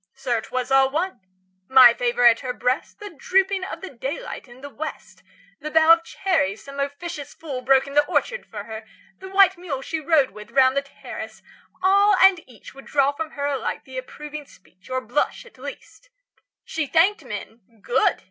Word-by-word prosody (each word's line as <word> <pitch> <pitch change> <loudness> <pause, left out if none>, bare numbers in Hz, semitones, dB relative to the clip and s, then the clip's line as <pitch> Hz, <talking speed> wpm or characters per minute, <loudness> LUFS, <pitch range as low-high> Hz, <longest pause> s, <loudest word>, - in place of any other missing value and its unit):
Sir, 250 -4 -1
'twas 255 +3 -4
all 270 0 +5
one! 340 +7 -2 0.5
My 255 -2 +8
favour 245 0 0
at 230 -1 +7
her 255 -2 -4
breast, 250 +2 -2
The 415 -1 -8
dropping 380 +4 +1
of - - -6
the 385 - -8
daylight 275 - -6
in 245 +1 -15
the 285 - -8
West, 315 +2 -8 0.4
The 305 - -5
bough 320 +1 +6
of 335 0 +1
cherries 325 - -1
some 280 0 -9
officious 285 +1 -5
fool 275 -6 -6
Broke 265 +1 +4
in 275 - -9
the 295 0 +5
orchard - - -1
for 210 -2 -7
her, 220 0 -8 0.4
the 380 - -9
white 385 -1 +4
mule 285 -7 -5
She 325 - -3
rode 310 -3 +2
with 210 +2 -12
round 260 +2 +4
the 280 - +2
terrace 275 - -10 0.4
all 400 +2 +5
and 380 -2 +5
each 230 -5 -14
Would 275 - -13
draw 280 -1 +2
from 310 +2 -5
her 285 -1 -3
alike 280 -2 -2
the 260 -1 -6
approving 300 +2 -9
speech, 185 -4 -22
30 - - -13
Or 260 0 -1
blush, 255 - -2
at 485 - -18
least. 330 - -10 0.6
She 320 -3 -3
thanked 365 +9 +3
men, 225 - -7 0.2
good! 260 +2 +2
280 Hz, 195 wpm, -23 LUFS, 255-335 Hz, 0.6 s, My